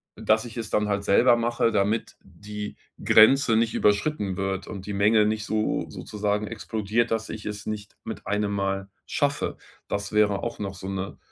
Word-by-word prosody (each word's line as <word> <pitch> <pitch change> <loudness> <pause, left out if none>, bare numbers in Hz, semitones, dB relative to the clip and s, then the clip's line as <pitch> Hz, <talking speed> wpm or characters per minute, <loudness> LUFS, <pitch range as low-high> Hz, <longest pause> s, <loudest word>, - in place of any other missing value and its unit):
dass 110 +2 +2
ich 120 0 -9
es 115 -2 -4
dann 105 0 +1
halt 100 0 0
selber 120 +4 +5
mache, 115 0 +1
damit 105 +1 0
die 105 +3 -8 0.3
Grenze 115 +1 +6
nicht 115 0 +2
überschritten 105 -2 +1
wird 95 0 -2
und 95 -2 -7
die 105 - -4
Menge 105 +2 +4
nicht 110 0 -1
so 110 0 0
sozusagen 105 0 -2
explodiert, 110 +1 -1
dass 110 -1 -1
ich 110 - -7
es 105 -1 -5
nicht 105 -1 -5
mit 110 - -7
einem 105 0 0
Mal 100 0 -2 0.2
schaffe. - - -1 0.3
Das 100 0 -3
wäre 105 -2 +2
auch 120 - -4
noch 100 -2 -4
so 95 +1 -8
'ne 95 0 -4
105 Hz, 180 wpm, -25 LUFS, 100-110 Hz, 0.3 s, Grenze